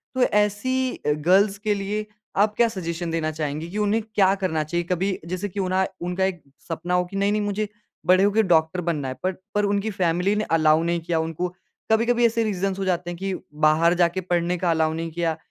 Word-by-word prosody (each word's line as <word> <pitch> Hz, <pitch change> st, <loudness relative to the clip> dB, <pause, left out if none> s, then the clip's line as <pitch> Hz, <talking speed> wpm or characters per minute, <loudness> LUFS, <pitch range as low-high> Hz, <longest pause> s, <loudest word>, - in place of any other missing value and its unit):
तो 255 Hz, -, +3 dB
ऐसी 245 Hz, +6 st, +1 dB
अ, 150 Hz, -, -2 dB
गर्ल्स 190 Hz, +7 st, +3 dB
के 210 Hz, +1 st, 0 dB
लिए 205 Hz, +1 st, -3 dB, 0.3 s
आप 210 Hz, +1 st, +3 dB
क्या 235 Hz, -, +4 dB
सजेशन 170 Hz, -5 st, -4 dB
देना 160 Hz, -1 st, -1 dB
चाहेंगी 155 Hz, +1 st, -4 dB
कि 210 Hz, -, -5 dB
उन्हें 210 Hz, +2 st, +1 dB
क्या 195 Hz, -1 st, +5 dB
करना 180 Hz, -5 st, -1 dB
चाहिए? 170 Hz, +3 st, -2 dB
कभी 185 Hz, +2 st, -1 dB
जैसे 185 Hz, +4 st, -3 dB
की 200 Hz, -, -6 dB
उन्हा 185 Hz, 0 st, +1 dB, 0.2 s
उनका 180 Hz, +2 st, 0 dB
एक 185 Hz, -3 st, -3 dB, 0.3 s
सपना 170 Hz, +2 st, -3 dB
हो 180 Hz, 0 st, +2 dB
कि 195 Hz, -, -10 dB
नहीं-नहीं 205 Hz, +2 st, +1 dB
मुझे 205 Hz, +1 st, -1 dB, 0.4 s
बड़े 185 Hz, +1 st, +5 dB
हो 205 Hz, -, +4 dB
के 220 Hz, -, +3 dB
डॉक्टर 170 Hz, 0 st, +2 dB
बनना 150 Hz, -5 st, -1 dB
है। 130 Hz, -, -3 dB
पर 185 Hz, -, +1 dB, 0.2 s
पर 205 Hz, -, +2 dB
उनकी 200 Hz, +2 st, 0 dB
फैमली 180 Hz, +1 st, +1 dB
ने 215 Hz, -, 0 dB
अलाओ 155 Hz, 0 st, +4 dB
नहीं 170 Hz, 0 st, 0 dB
किया 165 Hz, 0 st, -1 dB
उनको। 165 Hz, +2 st, -2 dB, 0.4 s
कभी-कभी 235 Hz, +2 st, +3 dB
ऐसे 230 Hz, 0 st, +2 dB
रीजन्स 195 Hz, -2 st, -1 dB
हो 195 Hz, -, -1 dB
जाते 180 Hz, -1 st, -1 dB
हैं 175 Hz, -, -5 dB
कि 195 Hz, 0 st, -3 dB, 0.3 s
बाहर 165 Hz, +3 st, +4 dB
जाके 175 Hz, +2 st, +2 dB
पढ़ने 175 Hz, 0 st, 0 dB
का 175 Hz, -1 st, +1 dB
अलाउ 160 Hz, -1 st, +1 dB
नहीं 165 Hz, 0 st, -4 dB
किया 165 Hz, -1 st, -1 dB
185 Hz, 215 wpm, -24 LUFS, 165-205 Hz, 0.4 s, क्या